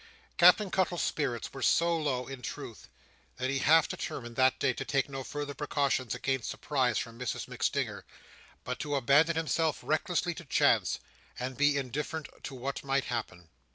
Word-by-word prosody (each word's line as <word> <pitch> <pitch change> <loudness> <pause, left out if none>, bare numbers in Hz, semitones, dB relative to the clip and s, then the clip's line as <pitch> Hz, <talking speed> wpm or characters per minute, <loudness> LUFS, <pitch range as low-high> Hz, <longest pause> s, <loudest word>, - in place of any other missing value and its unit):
Captain 210 -4 +6
Cuttle's 185 -2 +1
spirits 125 -6 -2
were 135 - -7
so 170 0 +3
low, 140 -6 -1
in 135 -1 -8
truth, - - -7 0.5
that 130 +1 -1
he 135 - 0
half 160 +3 +5
determined, 120 -2 -5
that 130 0 +4
day, 135 -2 +1
to 135 - -4
take 135 0 0
no 135 -1 -5
further 145 +1 -5
precautions 140 -5 0
against 135 -3 -1
surprise 130 -5 0
from 115 0 -4
Mrs 125 - -3
MacStinger, - - -1 0.6
but 125 +1 -4
to 145 -1 -2
abandon 140 +5 +4
himself 160 -1 +1
recklessly 170 +3 0
to 170 - -10
chance, - - +3 0.4
and 130 +1 -4
be 145 +1 +3
indifferent 145 +3 -3
to 135 - -7
what 130 +2 -4
might 135 0 +1
happen. 90 -7 -5
140 Hz, 165 wpm, -30 LUFS, 130-150 Hz, 0.6 s, Captain